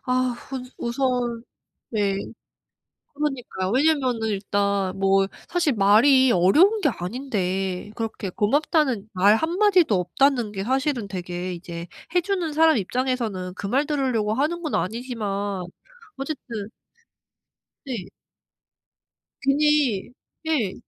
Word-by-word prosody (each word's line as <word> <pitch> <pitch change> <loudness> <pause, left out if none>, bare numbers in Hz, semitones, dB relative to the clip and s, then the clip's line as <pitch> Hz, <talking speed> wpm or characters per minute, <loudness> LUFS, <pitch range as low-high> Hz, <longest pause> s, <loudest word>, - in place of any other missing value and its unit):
아 255 -1 +1 0.2
우 260 -1 -3 0.2
우선 240 -1 -1 0.5
네. 205 -3 0 1.0
그러니까요. 260 -10 -3
왜냐하면은 260 -5 +2
일단 200 -1 -1
뭐 195 0 +3 0.2
사실 340 -6 +1
말이 235 +6 +5
어려운 320 - +4
게 295 - +3
아닌데 195 -3 -3
그렇게 225 -4 -4
고맙다는 255 - +1
말 200 +3 +5
한마디도 350 - +3
없다는 240 +5 +1
게 195 -2 -4
사실은 260 -1 0
되게 180 -1 -5
이제 170 0 -7 0.3
해 355 - +4
주는 360 -4 -2
사람 320 -2 +5
입장에서는 220 -4 -2
그 200 - -5
말 270 +7 +1
들으려고 255 -8 0
하는 315 +6 0
건 310 - -2
아니지만 205 -2 -3 0.5
어쨌든 250 -7 -5 1.2
네. 230 -9 -4 1.4
괜히 280 -6 +2 0.3
네. 280 -12 0
235 Hz, 235 characters per minute, -24 LUFS, 195-280 Hz, 1.4 s, 말이